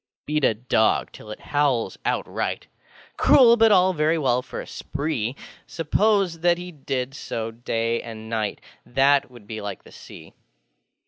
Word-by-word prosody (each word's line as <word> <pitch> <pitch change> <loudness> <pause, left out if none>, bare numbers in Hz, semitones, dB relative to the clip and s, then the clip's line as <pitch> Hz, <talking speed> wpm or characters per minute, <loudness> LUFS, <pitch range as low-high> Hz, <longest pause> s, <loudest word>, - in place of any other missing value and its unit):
Beat 150 0 -1
a 110 - +3
dog 110 -1 +1
till 105 - -13
it 105 - -7
howls 145 -5 0
outrightŌĆö - - -2 0.5
Cruel, 240 -4 +6
but 225 -1 +5
all 185 -1 +5
very 155 0 +1
well 125 -5 +1
for - - -8
a - - -6
spree: 140 -5 -3 0.3
Suppose 185 +1 +1
that 175 +1 +3
he 180 0 -7
did 135 -4 -4
so 115 -4 -5
day 115 0 -2
and 110 -1 -9
night, 110 -2 -2 0.2
That 135 +2 +2
would 120 -4 -15
be 110 0 -6
like 100 -2 -6
the - - -16
Sea. - - -13
135 Hz, 155 wpm, -23 LUFS, 115-165 Hz, 0.5 s, Cruel